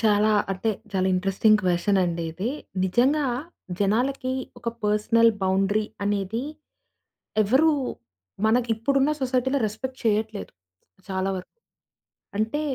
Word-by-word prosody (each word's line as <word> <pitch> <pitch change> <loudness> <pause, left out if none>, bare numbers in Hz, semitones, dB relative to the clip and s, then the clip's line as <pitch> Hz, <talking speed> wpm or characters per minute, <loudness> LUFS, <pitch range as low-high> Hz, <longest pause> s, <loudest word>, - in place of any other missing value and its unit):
చాలా 215 -1 +3 0.2
అంటే 195 +4 -1 0.2
చాలా 190 -1 +1
ఇంట్రెస్టింగ్ 195 +3 +3
క్వె‌షన్ 185 +2 +2
అండి 170 -1 -2
ఇది. 190 +8 -2 0.3
నిజంగా 260 +10 +2 0.5
జనాలకి 255 +6 +1 0.3
ఒక 240 - -4 0.2
పర్సనల్ 220 +2 +4
బౌండరీ 195 +3 +2 0.2
అనేది 205 +3 -1 1.0
ఎవ్వరు 265 +10 +4 0.8
మనకి 235 +2 +2
ఇప్పుడున్న 275 +5 +1
సొసైటీ‌లో 260 +1 +1
రెస్పెక్ట్ 255 +5 -6
చేయట్లేదు. 215 -1 0 0.6
చాలా 190 0 -1
వరకు. 185 - -7 0.9
అంటే 225 +8 0
215 Hz, 105 wpm, -25 LUFS, 195-245 Hz, 1.0 s, పర్సనల్